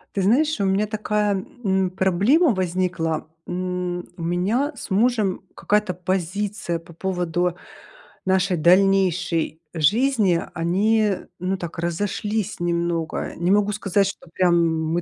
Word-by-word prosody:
Ты 195 Hz, -, +1 dB
знаешь, 280 Hz, +9 st, +2 dB
у 200 Hz, -, +1 dB
меня 195 Hz, +2 st, +1 dB
такая, 210 Hz, -2 st, -1 dB, 0.2 s
м, 190 Hz, -1 st, +1 dB
проблема 200 Hz, -, +3 dB
возникла. 180 Hz, -4 st, -1 dB, 0.2 s
М, 180 Hz, -1 st, -3 dB
у 170 Hz, -, -6 dB
меня 200 Hz, -, 0 dB
с 235 Hz, -, -8 dB
мужем 215 Hz, -2 st, +1 dB
какая-то 210 Hz, -2 st, +1 dB
позиция 185 Hz, 0 st, -2 dB
по 170 Hz, +1 st, -15 dB
поводу 175 Hz, -1 st, -1 dB, 0.7 s
нашей 190 Hz, -1 st, +2 dB
дальнейшей 180 Hz, -2 st, +2 dB
жизни. 205 Hz, -, +2 dB
Они, 200 Hz, +4 st, +2 dB, 0.2 s
ну, 185 Hz, +2 st, -1 dB
так 170 Hz, -2 st, -7 dB
разошлись 205 Hz, +5 st, -2 dB
немного. 170 Hz, -1 st, -1 dB
Не 175 Hz, +2 st, +1 dB
могу 205 Hz, 0 st, +3 dB
сказать, 200 Hz, -1 st, +1 dB
что 195 Hz, -, -7 dB
прям 180 Hz, -2 st, +3 dB, 0.4 s
мы 175 Hz, -, +1 dB
185 Hz, 125 wpm, -23 LUFS, 175-205 Hz, 0.7 s, проблема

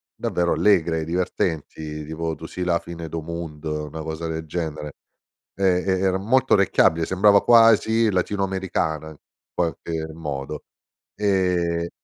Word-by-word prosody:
davvero 85 Hz, -1 st, 0 dB
allegre, 80 Hz, -2 st, +2 dB
divertenti 80 Hz, -3 st, -3 dB
tipo 80 Hz, +2 st, -3 dB
Tu 80 Hz, 0 st, -8 dB
si 90 Hz, -, -5 dB
la 85 Hz, -1 st, +1 dB
fine 85 Hz, -1 st, -8 dB
do' 80 Hz, -1 st, -4 dB
munno, 75 Hz, -2 st, -5 dB
una 80 Hz, +2 st, -7 dB
cosa 80 Hz, +1 st, -5 dB
del 80 Hz, 0 st, -4 dB
genere. 75 Hz, -3 st, -4 dB, 0.6 s
E 95 Hz, -2 st, +2 dB
e 95 Hz, -1 st, +1 dB
era 95 Hz, 0 st, +1 dB
molto 125 Hz, +6 st, +2 dB
orecchiabile, 85 Hz, -4 st, +3 dB
sembrava 100 Hz, +2 st, +4 dB
quasi 115 Hz, -1 st, +5 dB
latino 100 Hz, +2 st, 0 dB
americana, 90 Hz, -5 st, -2 dB
in 75 Hz, -, -13 dB, 0.3 s
qualche 80 Hz, -1 st, -2 dB
modo. 75 Hz, -2 st, -5 dB, 0.5 s
E 90 Hz, -4 st, +1 dB
85 Hz, 135 wpm, -23 LUFS, 80-95 Hz, 0.6 s, quasi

